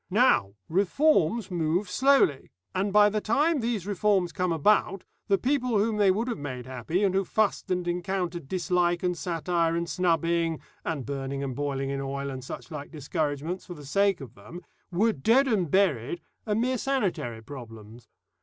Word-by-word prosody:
Now, 185 - +3
reforms 200 - +2
move 175 +3 0
slowly, 265 - +3 0.2
and 195 +2 0
by 205 +1 +6
the 210 +1 -1
time 290 +9 +2
these 230 -6 -2
reforms 195 -3 +1
come 180 -2 -1
about, 195 +3 +2 0.2
the 200 -2 +3
people 250 -3 +1
whom 215 +1 +1
they 205 -2 +4
would 215 +6 +1
have 235 -4 -3
made 130 -4 -5
happy, 130 - -2
and 195 -2 +2
who 195 +1 +2
fussed 210 +2 0
and 180 -1 -1
encountered 175 -2 -2
dislike 175 0 0
and 180 -1 +1
satire 170 -1 0
and 170 0 -1
snubbing, 170 -2 +1 0.2
and 145 -6 -3
burning 140 0 -4
and 130 -2 -4
boiling 135 -1 -2
in 135 0 -2
oil, 140 0 -3
and 130 -1 -6
suchlike 145 +2 -7
discouragements, 155 +4 -3
for 175 - -7
the 145 -2 -11
sake 195 +4 +2
of 135 - -9
them, 165 - -11 0.3
were 215 +6 +2
dead 235 - +3
and 195 - +1
buried 170 - +1 0.3
and 210 0 +1
mere 255 0 0
sanitary 185 - -1
problems. 115 -3 -11
175 Hz, 170 wpm, -27 LUFS, 145-205 Hz, 0.3 s, by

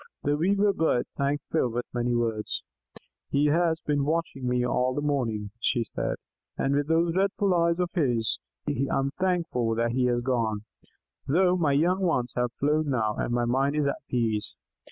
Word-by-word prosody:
The 145 +1 +2
Weaver 200 +5 +2
Bird 160 -8 +1
thanked 140 +1 0
Phil 155 -6 +2
with 120 +1 -3
many 120 0 0
words. 115 -2 -1 0.7
"He 145 +1 +2
has 165 0 +2
been 145 -1 0
watching 150 -4 -1
me 125 0 +1
all 125 +1 +1
the 145 - -1
morning," 115 -8 -1
she 120 0 +1
said, 105 - -3 0.4
"with 140 +1 +1
those 165 +1 +2
dreadful 195 +1 +1
eyes 170 -1 +2
of 180 -1 -1
his. 120 -9 0 0.3
I 140 -2 0
am 135 0 0
thankful 165 -11 0
that 115 +1 +1
he 125 +1 +1
has 120 -1 +1
gone, 115 -4 0 0.7
though 180 +5 +3
my 155 -6 +2
young 175 +6 +2
ones 145 -10 0
have 125 -1 0
flown 150 +1 +1
now, 110 -5 +1
and - - -1
my 120 0 +1
mind 135 +4 +1
is 150 -1 +1
at 140 - -1
peace. 110 -4 0
140 Hz, 175 wpm, -27 LUFS, 120-165 Hz, 0.7 s, though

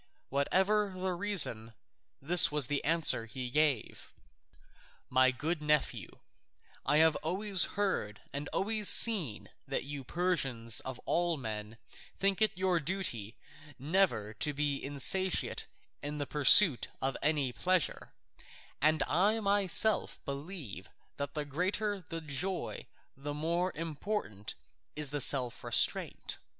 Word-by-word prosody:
Whatever 190 +9 0
the 185 0 -3
reason, 170 - +1 0.4
this 170 +3 +4
was 150 -2 +3
the 145 +1 -3
answer 160 -7 +3
he 125 +1 -7
gave: 150 -5 -1 1.0
"My 130 0 +4
good 150 +6 -3
nephew, 150 -1 -1 0.7
I 145 +3 +2
have 160 0 +4
always 190 +3 +1
heard 190 - -2
and 145 +1 -4
always 210 -1 +1
seen 195 - +3 0.2
that - - -3
you 140 -1 -7
Persians 135 -8 0
of 130 -1 -7
all 175 -1 0
men 110 -3 -7 0.4
think 195 +1 -1
it 215 -3 +3
your 185 -2 0
duty 140 - -4 0.4
never 140 - 0
to 150 +8 0
be 145 -1 -2
insatiate 175 +7 +1 0.3
in 145 +1 -5
the 145 - -3
pursuit 150 - +7
of 135 +1 -2
any 145 -4 0
pleasure; 185 +1 -1 0.7
and 155 +1 +2
I 205 +7 +1
myself 205 +1 +1
believe 140 - -8 0.3
that 140 +1 -5
the 150 -1 -2
greater 190 +6 -3
the 165 0 -6
joy 160 +5 -5 0.3
the 145 +2 -7
more 170 +4 -2
important 160 - -5 0.4
is 150 -2 -2
self 125 -4 +2
restraint. - - +2
150 Hz, 120 wpm, -31 LUFS, 135-185 Hz, 1.0 s, pursuit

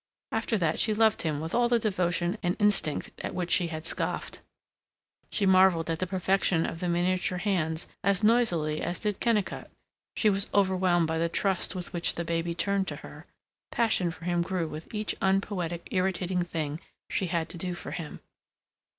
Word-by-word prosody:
After 225 0 0
that 165 -5 0
she 215 -1 +2
loved 220 -1 +3
him 155 -3 -1
with 160 +2 -4
all 240 0 +3
the 240 - +4
devotion 180 -4 0
and 175 0 0
instinct 205 -8 +1
at - - -5
which 175 -1 -2
she 175 - +3
had 160 -1 -6
scoffed. - - -3 0.9
She 205 - 0
marveled 185 -3 +5
at 160 - -2
the 185 - -1
perfection 185 -2 +1
of 165 - -4
the 180 - -1
miniature 180 +1 +1
hands 175 -5 -1 0.2
as 200 +1 +2
noisily 175 -10 +2
as 175 0 -2
did 210 0 -2
Kennicott, 220 -5 0 0.5
she 220 - +2
was 195 -1 +1
overwhelmed 185 -3 +3
by 160 0 -1
the 165 0 +1
trust 190 +2 0
with 180 -1 -5
which 175 -1 0
the 170 - -3
baby 170 +1 -1
turned 200 +1 0
to - - -3
her; - - -12 0.4
passion 220 -6 +2
for 165 0 -9
him 175 -1 +1
grew 170 -1 -1
with 155 +1 -8
each 210 -1 -2
unpoetic 190 -3 0
irritating 185 -1 0
thing 160 -3 -3 0.3
she 190 - 0
had 170 -2 -1
to 175 - -6
do 180 0 -2
for - - -7
him. 165 -4 -6
180 Hz, 185 wpm, -28 LUFS, 170-195 Hz, 0.9 s, marveled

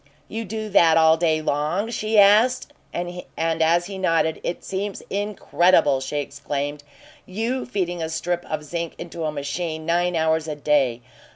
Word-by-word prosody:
"You 225 +1 -5
do 215 +2 -4
that 165 -4 +5
all 160 0 +6
day 160 -2 +1
long?" 155 +10 -1
she 215 -1 -1
asked, 215 +5 +5 0.2
and 175 0 -4 0.2
as 165 +1 +2
he 195 0 -7
nodded, 165 -3 +1
"It 175 - -4
seems 195 +1 -4
incredible!" 185 -8 +2
she 135 - -5
exclaimed. 145 +1 -4 0.4
"YOU 230 +7 -2
feeding 175 -7 -2
a 160 - -2
strip 175 +2 -2
of 155 -1 -3
zinc 170 +2 -4
into 170 -1 -6
a 155 - -1
machine 155 +3 -4
nine 175 +1 +1
hours 160 0 +1
a 155 - -3
day! 140 -5 +1
170 Hz, 160 wpm, -23 LUFS, 155-190 Hz, 0.4 s, all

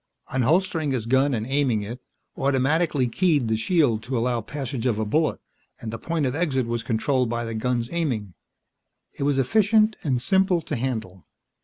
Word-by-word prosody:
Unholstering 150 +3 +1
his 120 -4 -2
gun 130 +4 +3
and 110 -4 -1
aiming 130 -5 +1
it 120 +5 -7 0.3
automatically 140 +1 +1
keyed 145 0 +1
the 110 - +1
shield 120 -2 +2
to 125 +2 -3
allow 120 0 0
passage 130 0 -4
of 115 -4 +1
a 110 - -1
bullet, 155 +9 +1 0.4
and 110 -1 -6
the 115 - -5
point 165 0 -1
of 125 - 0
exit 145 -5 0
was 115 0 -2
controlled 125 +2 0
by 120 0 -2
the 115 - -4
gun's 120 +1 -1
aiming. 125 - -2 0.8
It - - -11
was 140 0 +1
efficient 215 - +3
and 130 -5 +1
simple 190 +7 +2
to - - -4
handle. 110 -7 -4
130 Hz, 175 wpm, -24 LUFS, 115-150 Hz, 0.8 s, gun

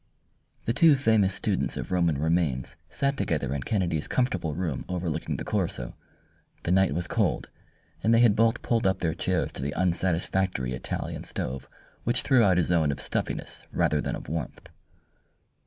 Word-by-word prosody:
The 115 - +1
two 150 +2 +6
famous 110 -7 +3
students - - 0
of - - -5
Roman 85 -5 +2
remains 75 -5 0
sat 140 0 0
together 70 - -1
in 70 - -2
Kennedy's 85 - 0
comfortable 95 - 0
room 85 -6 -2
overlooking 85 -3 -2
the - - -4
Corso. - - -2 0.7
The 85 - -1
night 95 -5 +3
was 85 +1 0
cold, - - 0 0.5
and 110 - +2
they 115 0 +5
had 115 -4 +5
both 115 +2 +2
pulled 115 -4 +1
up 95 0 +2
their 85 -3 -1
chairs - - -1
to - - -8
the 70 +1 -3
unsatisfactory 90 -5 0
Italian 60 - -4
stove 65 +1 -3 0.3
which 120 - +1
threw 130 -4 +4
out 95 -5 +4
a 90 - +4
zone 80 -3 +2
of 70 - -5
stuffiness - - -3
rather - - +1
than - - -2
of - - -9
warmth. 80 -3 -5
90 Hz, 170 wpm, -27 LUFS, 75-110 Hz, 0.7 s, two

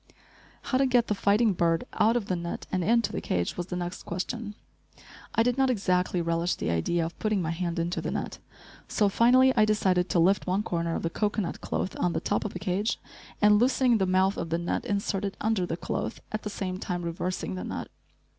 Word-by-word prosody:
How 255 - 0
to 270 - +4
get 245 -2 +3
the - - +3
fighting 210 +3 +3
little 190 - -1
bird 165 -1 +2
out 225 +3 +3
of 225 - -2
the 185 - -1
net 170 0 -5
and 185 -1 0
into 230 +4 +2
the - - -3
cage 90 -1 -1
was 175 0 -4
the 180 - -4
next 175 0 -4
question. 210 +4 -4 0.8
I 225 - +4
did 245 +2 0
not 265 -1 +4
exactly 185 -5 +1
relish 165 +1 0
the 80 - -2
idea 160 - 0
of 165 - -7
putting 215 -2 +1
my 165 -2 -1
hand 170 0 -2
into 170 +1 -1
the - - -3
net, - - -4 0.5
so 205 -2 +2
finally 255 +5 +5
I - - +5
decided 190 -4 +2
to - - +1
lift 185 +4 +3
one 190 +3 +1
corner 170 -3 -1
of - - -3
the 165 - -1
cocoanut 205 -3 -1
cloth 185 - -3
on 175 - +1
the - - 0
top 205 - -1
of 210 - -4
the - - -4
cage, 200 +3 -1 0.4
and, 210 0 +6
loosening 245 -1 +3
the 190 - +1
mouth 190 +1 +2
of 165 - -3
the 165 - +1
net, 170 0 -2
insert 200 -1 -1
it 200 -1 -3
under 210 -5 0
the 165 - -3
cloth, - - -3
at 215 - -3
the 210 - -4
same 185 -2 -4
time 175 -3 -3
reversing 170 - -3
the 90 -1 -5
net. - - -5
190 Hz, 230 wpm, -27 LUFS, 175-215 Hz, 0.8 s, and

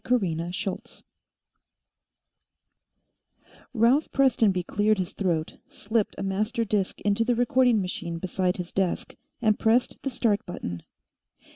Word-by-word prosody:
Ralph 245 +7 +3
Prestonby 225 -9 +3
cleared 210 +3 +1
his 185 -2 -3
throat, 170 -5 -1
slipped 220 0 -1
a - - -4
master 210 +4 -1
disk 200 -3 -1
into 205 +2 +1
the 245 +1 +1
recording 245 -1 +3
machine 175 -3 -4
beside 185 +1 -1
his 180 -1 -6
desk, 190 -2 -1 0.3
and 215 -1 +3
pressed 235 +2 +2
the 275 - -2
start 230 -5 0
button. 85 - -5
210 Hz, 110 wpm, -26 LUFS, 185-230 Hz, 0.3 s, Ralph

